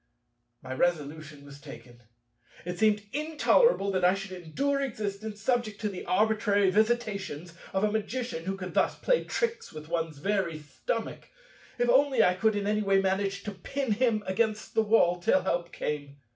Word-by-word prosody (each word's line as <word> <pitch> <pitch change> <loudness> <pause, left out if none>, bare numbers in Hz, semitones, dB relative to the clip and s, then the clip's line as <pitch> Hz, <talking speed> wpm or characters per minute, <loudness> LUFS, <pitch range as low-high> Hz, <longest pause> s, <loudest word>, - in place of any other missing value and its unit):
My 130 0 -5
resolution 150 -1 -2
was 140 0 -12
taken. 120 -3 -12 0.6
It 175 0 -5
seemed 210 -1 +3
intolerable 305 - +3
that 185 -1 -1
I 180 +2 +5
should 195 -1 -7
endure 185 - -1
existence 215 -4 -4
subject 235 -5 0
to 210 - 0
the 185 -3 -7
arbitrary 205 -1 +2
visitations 200 -7 0 0.2
of 190 +1 0
a 210 - +2
Magician 220 -4 -3
who 195 +1 -2
could 185 -1 -6
thus - - +1
play - - +1
tricks 465 -1 -2
with 155 0 -10
one's 165 -3 -2
very 190 -1 -1
stomach. 155 - -5 0.5
If 245 - +1
only 265 +2 +4
I 180 - +4
could 220 +3 +1
in 205 -1 -1
any 210 +1 +1
way 195 -1 +3
manage 195 +1 -1
to 210 - -4
pin 245 +7 -3
him 220 -1 +1
against 215 +3 -1
the 220 - +3
wall 205 -5 +3
till 185 +1 +3
help 175 -2 -1
came! 145 -1 -4
200 Hz, 170 wpm, -28 LUFS, 175-220 Hz, 0.6 s, I